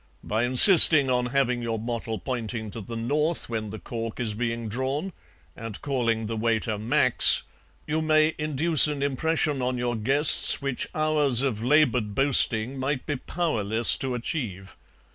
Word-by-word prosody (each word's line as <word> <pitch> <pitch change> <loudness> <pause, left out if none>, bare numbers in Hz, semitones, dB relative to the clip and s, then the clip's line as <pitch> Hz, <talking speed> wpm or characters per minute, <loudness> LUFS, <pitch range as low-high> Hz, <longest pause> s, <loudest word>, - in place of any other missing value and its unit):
By 110 +3 -2
insisting 140 +1 +7
on 125 -1 -1
having 125 -1 -2
your 115 -1 -4
bottle 115 0 -6
pointing 110 +1 -6
to 115 - -9
the 115 +4 -9
north 150 +8 -3
when 110 -2 -5
the 110 - -8
cork 115 0 -8
is 115 -3 -3
being 115 0 -5
drawn, 135 - -5 0.4
and 115 -2 -9
calling 115 -5 -2
the 115 +1 -5
waiter 110 -1 -2
Max, 120 +3 +4 0.4
you 155 +1 -3
may 155 0 +1
induce 155 +1 +2
an 145 -2 -4
impression 145 0 -2
on 125 0 -3
your 120 0 -3
guests 135 +7 +4
which 140 -2 -3
hours 150 -5 +1
of 120 -6 -3
laboured 125 -6 0
boasting 130 -2 +2
might 130 0 -4
be 145 - -4
powerless 115 - 0
to 130 -2 -4
achieve. 115 - -6
125 Hz, 155 wpm, -24 LUFS, 115-145 Hz, 0.4 s, insisting